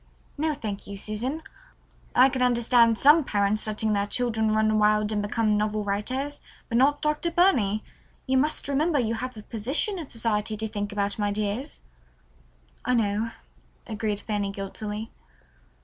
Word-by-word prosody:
"No, 310 +1 0
thank 210 -6 -6
you, 200 0 -7
Susan. 240 +10 -3 0.7
I 255 +2 +7
can 260 -1 -3
understand 235 -2 +4
some 300 +5 +6
parents 210 -2 0
letting 215 0 +1
their 200 0 0
children 220 -1 0
run 215 0 +2
wild 210 0 +3
and 210 -1 0
become 210 0 +1
novel 210 0 0
writers, 255 +8 -2 0.3
but 235 - +2
not 290 +2 +3
Dr. 300 +3 0
Burney. 250 - +2 0.4
You 260 0 +2
must 300 +2 0
remember 295 +3 +1
you 230 -3 +1
have 250 +1 -5
a 215 - -9
position 270 - -1
in 315 - -7
society 220 -2 -1
to 220 +1 -3
think 205 -1 -4
about, 200 0 -2
my 205 -1 +1
dears." 215 +7 -3 1.0
"I 250 - +1
know," 215 0 0 0.6
agreed 215 -2 -2
Fanny 205 -2 -2
guiltily. 210 +2 -5
220 Hz, 155 wpm, -26 LUFS, 210-260 Hz, 1.0 s, I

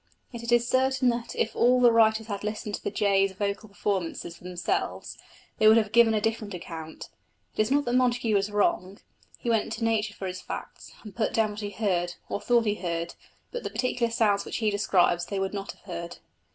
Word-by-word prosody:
Yet 235 -2 -7
it 235 0 -4
is 240 0 +4
certain 260 0 +2
that 235 0 -3
if 220 - -1
all 250 +1 +4
the 245 -1 +6
writers 220 -1 +4
had 205 -2 -5
listened 210 0 -4
to - - -5
the - - -1
jay's 195 -1 +2
vocal 200 +2 -3
performances 190 -4 -3
for - - -19
themselves, 180 -1 -3 0.4
they 215 - +5
would 220 +1 +8
have 215 -2 +1
given 230 -1 +5
a - - +2
different 215 -2 -2
account. 160 -2 -8 0.5
It - - +2
is 215 - +1
not 285 +2 +2
that 240 - -1
Montagu 245 -3 +2
was 200 0 +2
wrong: 200 -2 0 0.4
he 235 - -2
went 225 -2 +1
to 230 - -4
nature 220 -2 0
for 195 - -6
his 185 0 -5
facts - - -8
and 210 -4 -11
put 215 - -1
down 220 -1 +2
what 210 - -7
he 205 -1 -4
heard, 185 -4 -1
or 205 - -3
thought 240 -1 +3
he 210 - +2
heard, 170 -1 -3 0.4
but 485 - -4
the - - -4
particular 250 -2 -1
sounds 210 -3 +2
which - - -4
he 220 -3 +1
describes 180 -4 +2
they 200 - -3
would 195 0 -2
not 200 -1 -5
have - - -25
heard. 170 -3 -7
210 Hz, 220 wpm, -27 LUFS, 195-230 Hz, 0.5 s, would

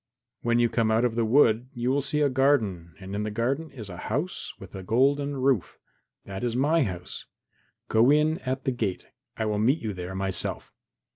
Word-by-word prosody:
When 120 0 +2
you 120 0 +4
come 115 -1 +1
out 110 +2 +3
of 120 - 0
the 115 0 +1
wood 120 0 +4
you 120 +1 0
will 140 +1 +2
see 150 +2 -1
a 145 - +4
garden 110 - +1
and 95 0 -8
in 100 - -2
the 105 - -2
garden 130 +9 -1
is 115 -7 -9
a 90 -3 -8
house 145 - -3
with 95 - -12
a 95 - -6
golden 140 +7 +1
roof. 130 - +1 0.5
That 95 +2 -6
is 120 -1 -1
my 150 +6 +3
house. 90 -8 -4 0.6
Go 115 +3 +4
in 155 +3 +3
at 130 -4 -3
the 130 - 0
gate; 100 -7 -3 0.3
I 110 - -1
will 105 -1 0
meet 125 +8 +3
you 110 -8 -4
there 90 0 -6
myself." 95 -1 -2
120 Hz, 205 wpm, -26 LUFS, 105-135 Hz, 0.6 s, you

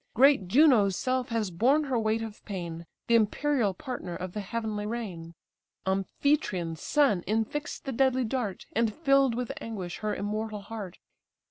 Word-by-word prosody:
Great 265 -5 +5
Juno's 230 - +5
self 255 -1 -1
has 225 -5 -1
borne 260 - +3
her 265 -5 0
weight 220 0 0
of 220 -2 -8
pain, 170 -4 -6 0.2
The 235 - +1
imperial 230 -1 +2
partner 185 -6 -5
of 180 +1 -6
the 210 - -3
heavenly 210 0 -3
reign; 185 -8 -5 0.5
Amphitryon's 190 - 0
son 275 -11 +3
infix'd 225 +8 -2
the 270 - -2
deadly 260 +1 +2
dart, 220 -5 -3
And 230 0 +2
fill'd 275 -5 +3
with 245 -1 -2
anguish 190 -6 -5
her 215 -1 -1
immortal 210 +1 -3
heart. 200 -3 -7
220 Hz, 150 wpm, -28 LUFS, 195-255 Hz, 0.5 s, Great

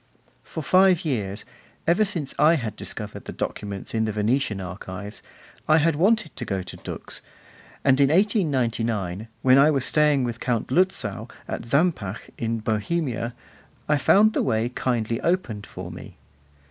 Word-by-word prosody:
For 160 - -6
five 185 +1 +4
years, 105 -9 -2 0.4
ever 175 +6 +4
since 170 -9 -2
I 155 +3 +6
had 115 -8 -3
discovered - - -6
the - - -6
documents 100 -2 -5
in 110 -1 +1
the 110 - -1
Venetian 105 0 0
archives, 95 +3 -7 0.5
I 155 +1 +6
had 165 0 +3
wanted 215 +7 +2
to - - -4
go 95 -2 -2
to - - -9
Dux; - - -7 0.6
and 135 0 +4
in 135 - +5
1899, 120 - +1 0.2
when 130 +1 +6
I 145 +2 +6
was 135 -4 +1
staying 150 -3 +3
with 120 -1 -3
Count 120 -3 -1
Lutzow 125 - 0 0.2
at - - -5
Zampach, 140 - 0
in 115 -1 -2
Bohemia, 120 +2 -1 0.5
I 150 -1 +2
found 215 +8 +5
the - - +1
way 110 +2 +1
kindly 115 -3 -1
opened 145 - -1
for - - -8
me. - - -11
125 Hz, 155 wpm, -24 LUFS, 110-160 Hz, 0.6 s, I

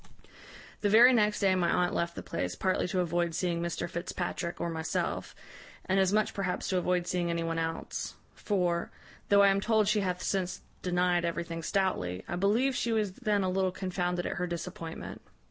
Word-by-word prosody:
"The 205 - +1
very 235 +5 +8
next 210 -3 +2
day 195 -1 +4
my 180 -2 +2
aunt 180 0 +2
left 170 0 -1
the - - -6
place, 90 0 -3
partly 185 - 0
to 180 +1 0
avoid 170 -1 0
seeing 170 -2 0
Mr 170 0 -2
Fitzpatrick 175 0 -4
or - - -1
myself, 160 0 -2 0.5
and 190 +1 +2
as 190 -1 +3
much 215 +1 +2
perhaps 195 -2 -2
to 185 - +1
avoid 180 0 +1
seeing 175 -1 -1
any 170 0 -1
one 165 0 -1
else; 165 0 -3 0.2
for, 175 -4 0 0.4
though 200 0 +6
I 200 - +7
am 195 0 +2
told 220 -1 +2
she 210 +1 +3
hath 180 -2 -2
since 185 -2 -1 0.2
denied 180 -1 +1
everything 170 0 -3
stoutly, 155 - -1
I - - -3
believe 220 +9 +2
she 235 - 0
was 215 -3 +1
then 210 -2 0
a 185 - +1
little 190 0 +1
confounded 180 -1 -2
at - - -3
her 180 +1 -1
disappointment. 170 -1 -6
180 Hz, 190 wpm, -30 LUFS, 170-200 Hz, 0.5 s, very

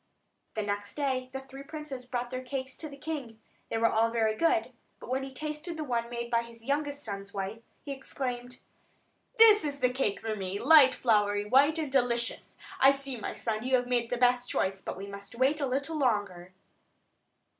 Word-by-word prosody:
The 215 - -1
next 205 0 -3
day 260 -3 -1
the 265 0 -5
three 270 0 -11
princes 285 -4 -7
brought 245 -1 -3
their 255 - -3
cakes 260 0 -5
to 310 - -6
the 280 - -11
king. 280 -7 -5 0.3
They - - -1
were 225 - +2
all 225 0 +3
very 220 -2 +1
good; 335 +5 +1 0.3
but - - -9
when 265 +1 +1
he 270 0 -6
tasted 305 +4 -5
the 310 - -3
one 235 -4 -1
made 235 0 -5
by 235 -1 +3
his 230 -1 -12
youngest 285 +1 -1
son's 200 -3 -6
wife, 200 +3 -4 0.2
he 285 - -5
exclaimed: 250 -2 -5 0.8
"That 435 -2 +8
is 285 -2 -3
the 250 -2 +2
cake 250 -6 -1
for 220 -1 -2
me! 190 -1 -3
light, 275 -1 +7
floury, 205 -3 +2
white, 280 +8 +4
and 305 -4 -2
delicious! 240 -3 0 0.2
I 270 - +8
see, 275 -1 -3
my 225 - -5
son, 220 -2 -2
you 260 +1 +2
have 245 -1 +1
made 240 -2 0
the 245 - -1
best 245 0 +3
choice; 190 0 0
but - - -5
we 195 - -6
must 200 +2 -9
wait 270 +5 +2
a 280 - +1
little 280 +5 -1
longer." 200 -8 0
250 Hz, 200 wpm, -29 LUFS, 225-275 Hz, 0.8 s, That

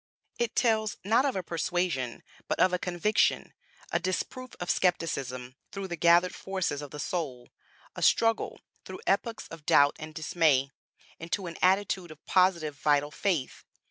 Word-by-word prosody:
It 235 -2 -1
tells 220 -3 +1
not 225 +7 +3
of 275 - 0
a 190 - -2
persuasion, 170 -6 -2 0.2
but - - -1
of 185 0 +4
a 180 - +1
conviction; 180 +5 +1 0.4
a 170 - +2
disproof 190 +8 -4
of 175 - 0
skepticism 135 -8 -1
through 195 -1 -5
the 175 - -3
gathered 170 +2 +4
forces 190 -7 -3
of 145 - -7
the 150 - -9
soul; 140 -8 -4 0.5
a - - -6
struggle, 225 -1 +2 0.2
through - - -9
epochs 230 -2 0
of 165 -2 -10
doubt 145 -1 +5
and 155 -1 -8
dismay, 155 -4 +2 0.5
into 170 +4 -3
an 170 -2 -7
attitude 190 -1 +2
of 155 -1 -14
positive 170 -6 +2
vital 145 0 +2
faith. 165 -6 -2
175 Hz, 155 wpm, -29 LUFS, 150-190 Hz, 0.5 s, doubt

